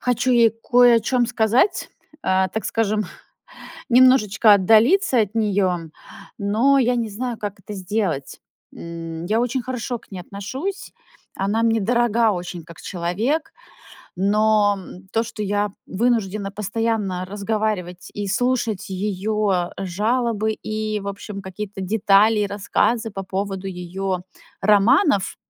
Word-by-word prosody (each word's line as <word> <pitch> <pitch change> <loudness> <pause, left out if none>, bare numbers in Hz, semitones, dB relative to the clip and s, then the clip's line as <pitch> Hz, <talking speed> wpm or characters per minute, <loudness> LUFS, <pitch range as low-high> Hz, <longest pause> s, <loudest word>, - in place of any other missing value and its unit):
хочу 250 +1 +1
ей 235 -2 +5
кое 240 +1 +4
о - - +2
чём 240 +2 +1
сказать, 245 - +1 0.3
а, 190 0 +2
так 215 +2 -4
скажем, 215 -1 0 0.9
немножечко 235 -4 +6
отдалиться 230 - +4
от 210 0 -1
неё, 200 -5 +1 0.6
но 225 +7 +3
я 250 -1 +2
не 230 -2 -1
знаю, 235 +2 -4
как 205 -1 -6
это 210 +2 -8
сделать. 185 -7 -3 0.3
М, 165 0 -7
я 220 +4 +1
очень 250 +1 -1
хорошо 250 -1 -4
к - - -24
ней 185 - -6
отношусь. 260 - -6 0.4
Она 205 +4 0
мне 225 -1 +2
дорога 235 0 +2
очень 175 -2 -6
как 170 +1 -13
человек, 210 - -2 0.6
но 205 +1 +3 0.3
то, 225 - +1
что 225 -2 -6
я 205 0 0 0.2
вынуждена 210 -2 0
постоянно 205 -2 -2
разговаривать 200 -3 -3
и 205 -1 -4
слушать 230 -1 -1
её 195 -1 -1
жалобы, 220 +3 0
и 215 0 -3
в 200 - -7
общем 200 0 -7
какие-то 195 +1 -7
детали, 210 +2 +3
и 205 - +1
рассказы 225 +3 0
по 195 -1 -5
поводу 195 0 -4
её 185 +1 -4 0.4
романов 210 - +3
210 Hz, 130 wpm, -22 LUFS, 195-230 Hz, 0.9 s, немножечко